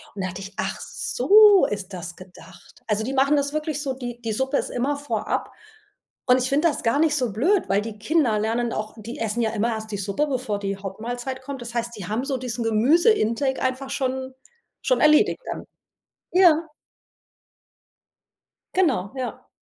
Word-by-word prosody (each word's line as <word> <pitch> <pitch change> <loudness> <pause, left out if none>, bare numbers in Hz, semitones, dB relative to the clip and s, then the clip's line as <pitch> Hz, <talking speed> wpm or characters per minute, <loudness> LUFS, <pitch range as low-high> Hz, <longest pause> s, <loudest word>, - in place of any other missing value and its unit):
Und 195 - -4
da 185 - -1
dachte 185 +2 -7
ich: 195 +1 -9
„Ach - - -2
so 415 -1 +5
ist 200 -2 -5
das 175 -1 -7
gedacht.” 185 0 -15
Also, 215 0 0
die 265 - -3
machen 275 +2 +3
das 285 +1 -1
wirklich 305 -1 -2
so, 270 -3 -2
die 245 -2 -7
die 225 -1 -3
Suppe 265 +4 0
ist - - -2
immer 275 +4 -1
vorab 290 0 -2 0.8
und 250 +1 +6
ich 255 - -1
finde 295 +5 +3
das 300 - -4
gar 230 +5 +2
nicht 310 -2 +3
so 250 -6 0
blöd, 350 - +2
weil 200 +1 +3
die 220 -1 -7
Kinder 250 -4 +2
lernen 230 +2 -1
auch 215 0 -4
die 225 +2 -8
essen 225 +1 -1
ja 220 -1 +1
immer 220 +3 0
erst 220 -1 -4
die - - -1
Suppe, 200 +10 -1
bevor 250 -7 -2
die 195 0 -2
Hauptmahlzeit 240 +7 -5
kommt. 270 -1 -7
Das 235 -1 -7
heißt, 235 0 -2
die 190 -4 -7
haben 230 +5 -1
so 275 -1 -1
diesen 245 -2 -4
Gemüse 265 - +4
Intake 265 - 0
einfach 260 +1 -2
schon 260 -1 -2 0.5
schon - - +2
erledigt 305 +7 +5
dann. - - -5 0.7
Ja. 340 -3 +5 2.1
Genau, 260 - +1
ja. 255 -2 -5
245 Hz, 185 wpm, -24 LUFS, 215-285 Hz, 2.1 s, und